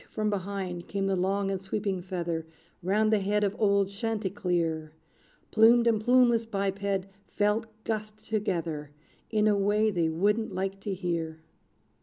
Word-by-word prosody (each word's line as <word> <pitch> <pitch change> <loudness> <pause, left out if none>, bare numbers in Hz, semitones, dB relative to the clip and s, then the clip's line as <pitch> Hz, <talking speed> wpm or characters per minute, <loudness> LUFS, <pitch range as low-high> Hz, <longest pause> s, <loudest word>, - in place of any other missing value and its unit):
from 215 -1 -1
behind 190 -3 -4
came 195 -1 -2
the 195 0 +1
long 195 +2 0
and 190 -1 -2
sweeping 195 -1 -2
feather, 175 -3 -3 0.4
Round 215 +4 +2
the 215 - +4
head 205 +2 +1
of 200 0 0
old 200 -2 +3
Chanticleer: 185 -7 -2 0.6
Plumed 230 +2 +6
and 225 -2 +3
plumeless 245 -1 +5
biped 200 -3 -2 0.5
felt 210 +2 0 0.2
gust 215 0 -4
together, 170 -9 -2 0.4
In 215 -1 +2
a 210 - +4
way 210 +2 +2
they 170 -4 +1
wouldn't 205 +5 0
like 195 +1 -2
to 195 -1 -3
hear. 165 -3 -3
200 Hz, 145 wpm, -28 LUFS, 180-215 Hz, 0.6 s, Plumed